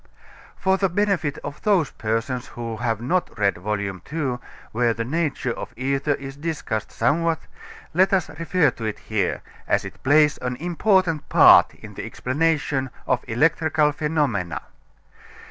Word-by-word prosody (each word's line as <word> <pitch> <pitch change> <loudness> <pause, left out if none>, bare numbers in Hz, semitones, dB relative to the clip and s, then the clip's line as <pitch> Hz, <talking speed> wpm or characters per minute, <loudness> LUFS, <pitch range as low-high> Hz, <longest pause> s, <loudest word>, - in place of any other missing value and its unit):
For 190 0 +2
the 195 0 +2
benefit 180 -6 0
of 145 - -7
those 190 -9 +2
persons 120 +3 -2
who 115 -2 -6
have 115 -2 -1
not 175 +9 -1
read 100 -1 +2
Vol. 105 +3 -2
II, 125 - -3 0.3
where 115 0 +1
the 115 - -3
nature 145 -2 -1
of - - -8
ether 140 +3 0
is 135 0 -8
discussed 145 -9 -3
somewhat, 160 +7 +1 0.5
let 185 +4 +4
us 190 -3 +2
refer 165 -2 +2
to 115 - -7
it 110 - -2
here, - - -2 0.2
as - - +1
it - - -10
plays 150 +2 +4
an 125 0 -3
important 175 +1 +1
part - - +7
in - - -12
the - - -6
explanation 145 -1 0 0.2
of 125 - 0
electrical 150 +4 +2
phenomena. 145 - -1
145 Hz, 145 wpm, -23 LUFS, 120-165 Hz, 0.5 s, part